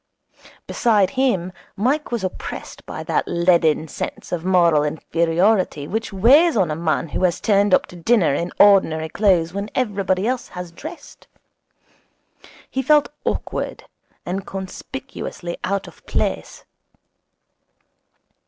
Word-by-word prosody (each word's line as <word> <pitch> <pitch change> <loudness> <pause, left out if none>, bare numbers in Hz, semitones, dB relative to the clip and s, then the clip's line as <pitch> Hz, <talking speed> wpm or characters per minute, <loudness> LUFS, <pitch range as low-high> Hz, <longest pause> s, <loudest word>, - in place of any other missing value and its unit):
Beside 210 -5 +2
him 240 -10 0 0.2
Mike 265 +9 0
was 235 -4 -2
oppressed 185 - -6
by - - -6
that - - -1
leaden 170 -3 +2
sense - - -6
of 175 -2 -2
moral 170 -5 +4
inferiority 165 +2 +1
which 220 +5 -3
weighs 255 - +5
on 180 -6 +2
a - - -1
man 160 0 -1
who 185 - -3
has 180 -2 +2
turned 205 -1 +2
up - - +4
to - - -14
dinner 175 -2 +2
in 170 +5 -2
ordinary 165 -6 +5
clothes 175 -4 +2
when 200 +2 -4
everybody 200 -5 0
else 250 +1 -1
has 180 -1 -8
dressed. 315 - -11 1.4
He 265 - -2
felt 295 +2 +3 0.2
awkward - - -3 0.4
and 190 +2 -4
conspicuously 190 -1 -6
out 195 +1 -2
of - - -15
place. - - -2
190 Hz, 125 wpm, -21 LUFS, 170-225 Hz, 1.4 s, weighs